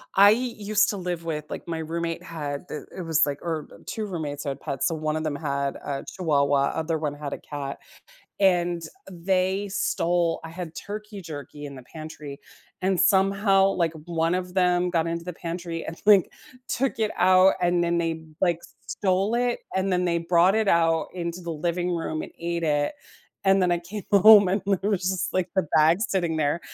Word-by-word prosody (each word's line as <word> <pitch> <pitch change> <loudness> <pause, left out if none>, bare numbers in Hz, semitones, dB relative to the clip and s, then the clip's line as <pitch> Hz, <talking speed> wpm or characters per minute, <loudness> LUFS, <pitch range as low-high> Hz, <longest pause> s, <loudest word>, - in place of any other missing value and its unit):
I 200 +1 +8
used 215 -3 +1
to 205 - -2
live 175 -2 -4
with, 150 -2 -3
like - - -7
My 165 - -3
roommate 165 +2 -3
had 155 -2 -5
the 150 - -6
it 185 - -5
was 160 -2 +3
like 145 -1 -3
or, 160 -3 -3
uh, - - -13
2 220 -1 -4
roommates 150 -6 -4
had 140 -1 -3
pets. 140 0 -2
So 165 - -1
one 155 0 -2
of 155 - -2
them 150 -2 -2
had 140 -2 -2
a 140 -1 -5
chihuahua, 140 -5 +1
other 160 0 -1
one 150 -2 -2
had 145 -1 -6
a - - -4
cat, 140 -2 -6 0.6
and 175 -3 +2 0.3
they 190 +3 0
stole 175 -4 0
I 165 - -7
had 170 -1 -7
turkey 210 0 -7
jerky 145 -1 -8
in 140 - -8
the 130 - -11
pantry, 155 -3 -8 0.4
and 190 -1 +1
somehow, 195 0 +4
like, 170 -4 0
one 165 0 0
of 180 -1 -4
them 180 -1 +2
got 165 -2 +1
into 170 0 -3
the 180 - -5
pantry 170 0 -5
and, 165 - -7
like, 205 -3 +6 0.4
took 260 -2 -1
it 215 - +2
out, 185 +1 +5
and 175 0 +2
then 170 0 +1
they 165 -1 0
b 160 -1 -13
like, 175 -3 +2 0.3
stole 195 +2 0
it, 245 0 0 0.2
and 190 +1 +1
then 180 0 +1
they 170 -1 +1
brought 170 +2 +4
it 220 -2 +1
out 165 -2 +3
into 170 0 -4
the 170 -1 -5
living 175 +3 -1
room 165 -2 -2
and - - -8
ate 170 0 -2
it, 145 - +1 0.5
and 195 0 +4
then 180 - +2
I 175 - +1
came 195 +4 -7
home, 205 0 +8
and 195 +2 +1
there 200 0 0
was 195 -3 0
just, 190 +1 -1
like, 185 -1 0
the 185 -5 +1
bag 155 +2 +5
sitting 175 -7 0
there, 150 +2 +1
170 Hz, 200 wpm, -25 LUFS, 160-190 Hz, 0.6 s, I